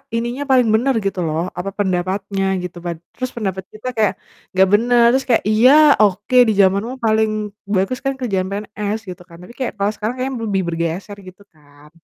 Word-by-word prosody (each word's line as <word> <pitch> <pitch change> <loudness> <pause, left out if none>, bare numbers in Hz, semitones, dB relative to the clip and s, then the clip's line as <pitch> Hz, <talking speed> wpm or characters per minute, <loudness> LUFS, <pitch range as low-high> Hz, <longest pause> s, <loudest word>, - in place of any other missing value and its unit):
ininya 240 +4 -2
paling 250 -3 +4
bener 255 +5 +2
gitu 195 -2 -2
loh, 155 +2 -1 0.2
apa, 190 +2 -3
pendapatnya 195 +1 -1 0.2
gitu 180 -1 -7
pad 170 -1 -3 0.2
terus 255 -1 -4
pendapat 190 -4 -3
kita 215 +4 -8
kayak, 215 -2 +2 0.4
gak 190 0 +6
bener 240 +2 +4
terus 265 +1 0
kayak, 235 - +3
iya, 235 +5 +5 0.3
oke, 210 +4 +1
di 220 - +2
zamanmu 200 +6 +1
paling 220 0 +2 0.5
bagus 195 +7 0
kan 270 0 0
kerjaan 195 -7 -1
PNS 210 +1 -4
gitu 180 0 -8
kan, 170 -1 -14
tapi 210 +7 -13
kayak 255 - -2
kalau 200 +1 +1
sekarang 220 +4 -3
kayaknya 265 +1 -2
lebih 195 -2 0
bergeser 170 +5 -3
gitu 185 +2 -13
kan. 145 0 -20
205 Hz, 185 wpm, -19 LUFS, 185-235 Hz, 0.5 s, gak